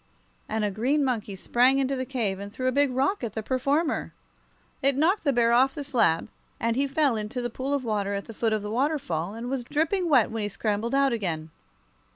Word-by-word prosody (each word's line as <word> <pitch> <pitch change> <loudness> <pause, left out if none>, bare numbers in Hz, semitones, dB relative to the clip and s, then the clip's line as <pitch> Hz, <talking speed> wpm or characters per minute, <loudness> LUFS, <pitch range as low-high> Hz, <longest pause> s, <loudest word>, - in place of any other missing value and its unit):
and 220 -1 0
a 205 - -1
green 265 +9 +1
monkey 220 -6 -2
sprang 250 +7 +3
into 275 0 +1
the 255 -1 -3
cave 220 -8 -1
and 200 0 -7
threw 255 - -5
a 255 - +3
big 285 +2 +3
rock 270 +8 0
at 225 -4 -3
the 220 - -4
performer. 280 +6 0 0.7
It 275 -1 +2
knocked 345 +7 +2
the 285 - +3
bear 235 -2 +3
off 265 +3 +4
the 290 - -4
slab, 225 - +2 0.3
and 230 0 0
he 275 +2 +1
fell 280 -3 +2
into 215 +3 -4
the 240 -1 -3
pool 260 +4 -4
of 280 - -2
water 200 -2 -1
at 200 - -4
the 225 - -9
foot 225 +1 0
of 215 -1 0
the 210 - -4
waterfall, 225 - -1
and 230 +2 -6
was 260 -1 -2
dripping 325 +7 0
wet 255 -8 +4
when 225 -1 -3
he 205 - -1
scrambled 215 +4 -1
out 275 -2 +3
again. 165 -8 -3
245 Hz, 225 wpm, -26 LUFS, 215-275 Hz, 0.7 s, off